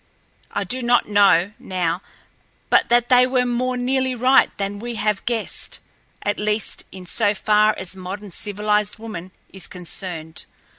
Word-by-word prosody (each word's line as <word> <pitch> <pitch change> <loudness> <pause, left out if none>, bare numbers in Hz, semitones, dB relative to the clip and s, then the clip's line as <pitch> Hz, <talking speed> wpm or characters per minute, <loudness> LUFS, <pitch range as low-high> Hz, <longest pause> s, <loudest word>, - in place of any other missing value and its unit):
I 205 - -2
do 250 +7 -3
not 240 0 +3
know, 200 -2 +4
now, 180 -1 -2 0.7
but - - +4
that 240 0 +3
they 250 0 +6
were 255 -1 +2
more 250 +1 0
nearly 260 +1 0
right 255 +3 +5
than 200 0 -3
we 240 +2 -5
have 210 -2 0
guessed, 235 -2 -1 0.5
at 205 - -1
least 210 0 -1
in 185 -1 -10
so 205 +3 +1
far 215 +2 +3
as 190 0 -4
modern 190 +2 -7
civilized 210 +2 -1
woman 190 -5 -7 0.2
is 190 - -7
concerned. 175 -3 -7
210 Hz, 150 wpm, -22 LUFS, 190-240 Hz, 0.7 s, they